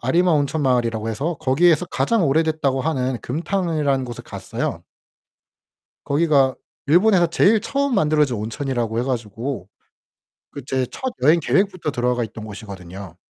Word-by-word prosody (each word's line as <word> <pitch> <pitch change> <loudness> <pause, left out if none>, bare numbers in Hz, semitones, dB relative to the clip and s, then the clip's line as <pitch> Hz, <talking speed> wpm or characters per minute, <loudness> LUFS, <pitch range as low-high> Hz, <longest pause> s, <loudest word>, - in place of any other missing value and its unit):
아리마 175 +1 +2
온천마을이라고 125 -7 +1
해서 145 +10 -2
거기에서 165 +5 +3
"가장 225 +2 +1
오래됐다."고 155 -2 +1
하는 130 -4 -1
금탕이라는 155 -3 -1
곳을 120 -2 -8
갔어요. - - -4 1.2
거기가 140 -3 +3 0.3
일본에서 175 +3 +4
제일 200 +6 +3
처음 280 +4 -1
만들어진 150 -6 +2
온천이라고 115 +1 -3
해 - - 0
가지고 120 -3 -4 0.8
그 140 - -7
제 130 -1 0
첫 260 -1 -4
여행 155 +5 +5
계획부터 185 -1 0
들어가 125 -1 0
있던 110 0 -10
곳이거든요. 100 -4 -9
140 Hz, 350 characters per minute, -21 LUFS, 120-170 Hz, 1.2 s, 여행